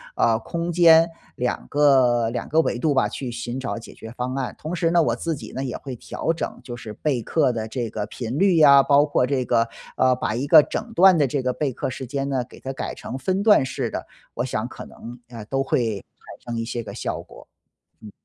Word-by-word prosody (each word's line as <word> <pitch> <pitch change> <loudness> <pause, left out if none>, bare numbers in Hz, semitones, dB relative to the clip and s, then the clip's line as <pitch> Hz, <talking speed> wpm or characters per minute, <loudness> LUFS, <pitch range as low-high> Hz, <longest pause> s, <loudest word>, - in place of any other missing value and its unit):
啊， 115 -1 +3
空 170 +9 -4
间 165 -1 +6 0.3
两 125 0 -2
个 130 -5 +4
两 120 - -4
个 160 - +3
维 120 - -1
度 145 +4 +1
吧 130 - +2
去 130 -3 -5
寻 120 +1 -5
找 125 -3 -4
解 115 - -12
决 110 - -10
方 125 +2 -4
案。 130 -2 -3
同 160 +4 -4
时 165 -1 +1
呢， 170 0 +4
我 155 - +1
自 165 -1 -2
己 145 - -9
呢， 130 - -3
也 130 - -4
会 130 -3 -7
调 165 - -3
整 165 - -5
就 120 - -7
是 115 -2 -8
备 130 +1 -1
课 140 0 +1
的 110 -2 -3
这 120 -1 -3
个 105 -1 -4
频 120 +4 -5
率 190 -2 +4
呀， 140 -3 +7
包 145 +1 +4
括 145 -4 +1
这 130 -2 -1
个， 115 -1 +2 0.3
呃， 130 0 +3
把 110 -3 -2
一 130 +4 -2
个 155 +1 +8
整 225 +9 -5
段 185 -2 +6
的 145 - +3
这 135 +1 -1
个 125 0 -1
备 140 -1 -1
课 125 - -3
时 130 +1 -6
间 135 +2 -3
呢， 130 -2 0
给 - - -15
它 135 0 -5
改 - - -4
成 130 - -7
分 185 +9 -1
段 205 -9 +5
式 - - -3
的， - - -5 0.3
我 125 - -1
想 110 -2 -2
可 - - -10
能， 120 +1 -11
啊， 115 -3 -8
都 135 +4 -1
会 115 -6 0 0.5
产 120 - -6
生 115 - -2
一 - - -3
些 120 0 -4
个 - - -8
效 - - -4
果。 - - -15 0.6
嗯。 105 - -10
130 Hz, 260 characters per minute, -23 LUFS, 120-150 Hz, 0.6 s, 个